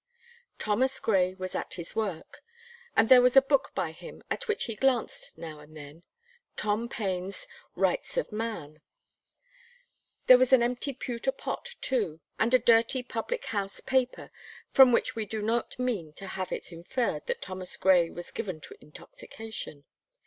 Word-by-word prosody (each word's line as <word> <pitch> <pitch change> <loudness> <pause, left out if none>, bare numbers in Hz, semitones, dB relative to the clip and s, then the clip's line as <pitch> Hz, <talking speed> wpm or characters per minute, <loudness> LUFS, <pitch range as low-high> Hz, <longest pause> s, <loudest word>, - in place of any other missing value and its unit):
Thomas 255 +6 +1
Gray 185 -3 +2
was 185 -1 -5
at - - -3
his 170 -1 -6
work, 195 -7 -4 0.6
and - - +5
there 255 0 +9
was 250 +2 +4
a - - +14
book 275 -1 +1
by 160 - -1
him 160 - -12
at - - -3
which 435 -1 0
he 230 - -3
glanced 255 0 0
now 155 -2 -8
and 150 +1 -14
then, 145 +2 -11 0.6
Tom 215 +3 0
Paine's 195 - -3 0.3
"Rights - - 0
of - - -1
Man." 190 -9 -5 1.4
There 255 -1 +9
was 255 +1 +3
an 250 -2 +7
empty 245 +3 -1
pewter 250 0 -2
pot 485 - -5
too, 205 -12 0 0.2
and 225 - +2
a - - +9
dirty 235 +2 +3
public 245 - -4
house 200 -1 -1
paper, 260 -1 -1 0.4
from 265 -2 +8
which 235 - +1
we 220 -2 -3
do 220 +2 -3
not 225 +3 -1
mean 220 -12 -2
to 195 - -8
have 185 -1 -4
it - - -5
inferred 170 - -2
that - - -2
Thomas 185 0 -6
Gray 180 -3 +4
was 175 - -8
given 185 -7 -4
to 135 - -10
intoxication. 155 -1 -9
220 Hz, 165 wpm, -29 LUFS, 180-250 Hz, 1.4 s, a